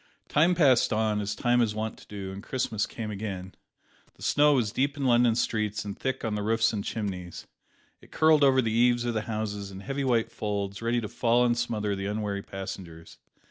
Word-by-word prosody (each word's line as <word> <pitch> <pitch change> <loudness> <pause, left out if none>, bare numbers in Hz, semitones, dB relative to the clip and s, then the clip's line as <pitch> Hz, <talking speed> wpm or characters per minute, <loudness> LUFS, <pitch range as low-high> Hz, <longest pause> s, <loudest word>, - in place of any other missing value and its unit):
Time 170 +4 +3
passed 135 -8 +4
on, 110 -1 +1
as 105 0 -3
time 120 0 +2
is 110 -3 0
wont 110 0 -3
to - - -16
do, 100 -2 -6
and 95 +1 -7
Christmas 115 -3 -2
came 110 -2 -6
again. 95 -3 -5 0.6
The - - -14
snow 150 0 +4
was 115 -5 +1
deep 140 +4 0
in 140 - -2
London 120 -2 +4
streets 105 -3 -1
and 100 - -5
thick 130 -2 -3
on 110 - -1
the 105 - -2
roofs 115 +2 +2
and 100 -2 -2
chimneys. 95 -6 -5 0.6
It - - -18
curled 155 -2 +4
over 130 -2 +5
the 110 - 0
eaves 120 +1 +3
of 120 - -1
the 110 - -1
houses 105 -2 -3
in 95 0 -9
heavy 140 +5 -3
white 120 -4 +1
folds 100 -1 -3
ready 120 +1 0
to 105 - -4
fall 120 +3 +2
and 120 -1 +2
smother 110 -4 -1
the 95 0 -4
unwary 105 -1 -2
passengers. 95 -4 -8
110 Hz, 210 wpm, -27 LUFS, 100-120 Hz, 0.6 s, over